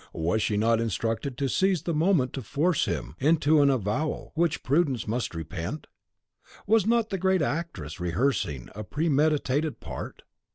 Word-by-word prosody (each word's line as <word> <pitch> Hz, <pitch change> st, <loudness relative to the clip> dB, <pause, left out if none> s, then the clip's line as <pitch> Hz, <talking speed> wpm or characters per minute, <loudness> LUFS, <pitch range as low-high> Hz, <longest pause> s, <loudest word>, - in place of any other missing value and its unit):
Was 85 Hz, +7 st, 0 dB
she 105 Hz, -, 0 dB
not 115 Hz, +2 st, +2 dB
instructed 115 Hz, +4 st, -2 dB
to 140 Hz, -, 0 dB
seize 185 Hz, +4 st, +1 dB
the 170 Hz, -, -1 dB
moment 155 Hz, -5 st, +2 dB
to 135 Hz, -, -4 dB
force 150 Hz, -, +1 dB
him 85 Hz, -, -3 dB
into 155 Hz, +1 st, +4 dB
an 140 Hz, -, +5 dB
avowal 130 Hz, +4 st, -1 dB
which 170 Hz, -1 st, 0 dB
prudence 135 Hz, -5 st, +1 dB
must 115 Hz, -4 st, -2 dB
repent? 80 Hz, -, -5 dB, 0.8 s
Was 215 Hz, -1 st, +3 dB
not 230 Hz, -1 st, +2 dB
the 195 Hz, -, -1 dB
great 190 Hz, -2 st, +2 dB
actress 140 Hz, -, -4 dB
rehearsing 85 Hz, -, -1 dB
a 110 Hz, -, -6 dB
premeditated 150 Hz, -, +1 dB
part? -, -, -7 dB
140 Hz, 155 wpm, -27 LUFS, 110-160 Hz, 0.8 s, an